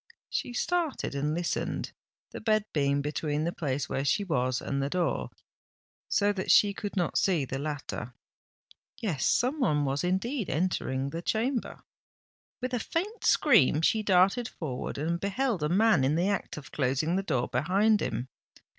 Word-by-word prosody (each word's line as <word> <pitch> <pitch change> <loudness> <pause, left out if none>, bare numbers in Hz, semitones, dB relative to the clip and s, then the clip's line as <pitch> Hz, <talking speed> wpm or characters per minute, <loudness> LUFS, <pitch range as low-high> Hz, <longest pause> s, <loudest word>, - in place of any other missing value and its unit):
She - - -2
started 335 - -1
and 145 +2 -1
listened, 175 0 -2 0.4
the - - -7
bed 215 -1 +2
being 140 -1 +1
between 150 0 -1
the 170 - 0
place 145 -3 -2
where 135 - -2
she 175 +8 +1
was 130 -8 0
and 140 0 -2
the 140 - -1
door, 175 +1 -1 0.8
so 205 0 +2
that 185 -2 -4
she 205 -1 +6
could 205 0 -6
not 175 -3 +1
see 170 -8 +2
the 130 +1 -4
latter. 145 -5 -5 0.8
Yes—some 235 - 0
one 150 - +2
was 140 +1 -1
indeed 200 +6 -1
entering 140 -4 -1
the 165 - -4
chamber. 235 +6 -2 0.8
With 255 0 -3
a 245 - +1
faint 390 - -3
scream 185 - +4
she 220 +6 +3
darted 195 +4 +3
forward, 150 - -5
and 165 +4 -1
beheld 205 - -1
a 150 - 0
man 205 -4 +4
in 140 +3 +2
the 175 +4 +1
act 200 -5 -2
of 145 - -10
closing 140 +5 0
the 195 - +1
door 130 -10 -1
behind 195 - +2
him. 120 +3 -2
175 Hz, 165 wpm, -29 LUFS, 140-215 Hz, 0.8 s, she